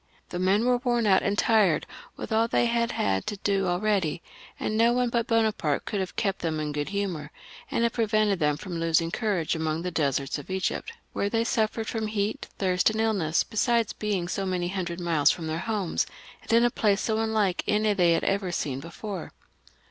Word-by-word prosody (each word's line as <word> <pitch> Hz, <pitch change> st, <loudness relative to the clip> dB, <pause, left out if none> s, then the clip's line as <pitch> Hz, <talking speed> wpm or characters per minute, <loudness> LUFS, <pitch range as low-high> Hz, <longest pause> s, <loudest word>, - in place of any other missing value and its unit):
The 175 Hz, -, -4 dB
men 195 Hz, +5 st, +2 dB
were 250 Hz, -1 st, +3 dB
worn 240 Hz, -2 st, +1 dB
out 190 Hz, -2 st, +5 dB
and 200 Hz, +1 st, 0 dB
tired 205 Hz, -10 st, +3 dB, 0.3 s
with -, -, -6 dB
all 225 Hz, +1 st, +3 dB
they 235 Hz, -, +2 dB
had 235 Hz, 0 st, +1 dB
had 95 Hz, -1 st, 0 dB
to 205 Hz, -, -3 dB
do 195 Hz, -1 st, 0 dB
already, 180 Hz, -3 st, 0 dB, 0.4 s
and 215 Hz, -, -2 dB
no 230 Hz, +2 st, +4 dB
one 250 Hz, 0 st, +1 dB
but 235 Hz, 0 st, 0 dB
Bonaparte 220 Hz, -, +1 dB
could 205 Hz, -, -2 dB
have 190 Hz, -1 st, -4 dB
kept 195 Hz, -3 st, -1 dB
them 160 Hz, -2 st, -2 dB
in 150 Hz, -1 st, -2 dB
a -, -, -3 dB
good 145 Hz, +2 st, -3 dB
humour, 190 Hz, -7 st, -3 dB, 0.4 s
and 230 Hz, -, 0 dB
have 235 Hz, -, +1 dB
pre 230 Hz, -, +1 dB
vented 210 Hz, -2 st, +2 dB
them 150 Hz, -2 st, +2 dB
from 170 Hz, +1 st, -5 dB
losing 165 Hz, 0 st, +2 dB
courage 200 Hz, -8 st, 0 dB
among 160 Hz, 0 st, -2 dB
the 180 Hz, -, -2 dB
deserts 140 Hz, -3 st, 0 dB
of 145 Hz, -, -11 dB
Egypt, 190 Hz, -, -2 dB, 0.2 s
where 200 Hz, -, 0 dB
they 225 Hz, +1 st, +1 dB
suffered 225 Hz, -1 st, 0 dB
from 220 Hz, -1 st, -2 dB
heat, 210 Hz, 0 st, -2 dB
thirst, 185 Hz, -1 st, +2 dB
and 220 Hz, 0 st, -3 dB
iUness, 195 Hz, -8 st, +1 dB
besides 230 Hz, 0 st, +1 dB
being 200 Hz, -5 st, -2 dB
so 195 Hz, +2 st, -2 dB
many 180 Hz, -2 st, -1 dB
hundred 180 Hz, -2 st, -3 dB
miles 165 Hz, -4 st, +3 dB
from 165 Hz, -, -1 dB
their 160 Hz, +1 st, -2 dB
homes, 210 Hz, -5 st, -1 dB, 0.3 s
and -, -, -7 dB
in 230 Hz, +1 st, +5 dB
a 240 Hz, -, +2 dB
place 205 Hz, -3 st, +1 dB
ao 220 Hz, -1 st, +1 dB
imlLke 220 Hz, -4 st, +1 dB
any 210 Hz, 0 st, +2 dB
they 175 Hz, -4 st, +4 dB
had -, -, 0 dB
ever 195 Hz, -2 st, 0 dB
seen 140 Hz, -6 st, -2 dB
before. 175 Hz, +4 st, -7 dB
195 Hz, 210 wpm, -27 LUFS, 170-220 Hz, 0.4 s, out